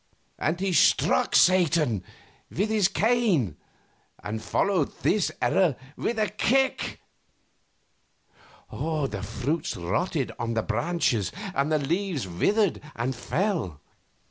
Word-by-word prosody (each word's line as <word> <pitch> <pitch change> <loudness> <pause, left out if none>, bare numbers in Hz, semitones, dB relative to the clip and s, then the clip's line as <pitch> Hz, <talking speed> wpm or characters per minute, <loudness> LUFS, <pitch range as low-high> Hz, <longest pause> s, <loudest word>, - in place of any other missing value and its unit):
and 160 +3 0
he 195 -2 0
struck 160 - +3
Satan 165 - +4 0.5
with 200 +5 -1
his 215 -4 +3
cane 200 - +1 0.7
and 110 +1 -4
followed 185 - +1
this 210 -4 +2
error 180 -8 +2 0.2
with 235 - -2
a 215 -1 +2
kick. 260 +6 0 1.7
The 140 -11 -2
fruits 125 - -3
rotted 130 - -1
on 115 -1 -2
the 110 - 0
branches, 120 - 0 0.2
and 140 0 0
the 155 - +4
leaves 160 - -2
withered 200 - +1
and 120 +3 -1
fell. 155 - -2
160 Hz, 110 wpm, -26 LUFS, 115-195 Hz, 1.7 s, Satan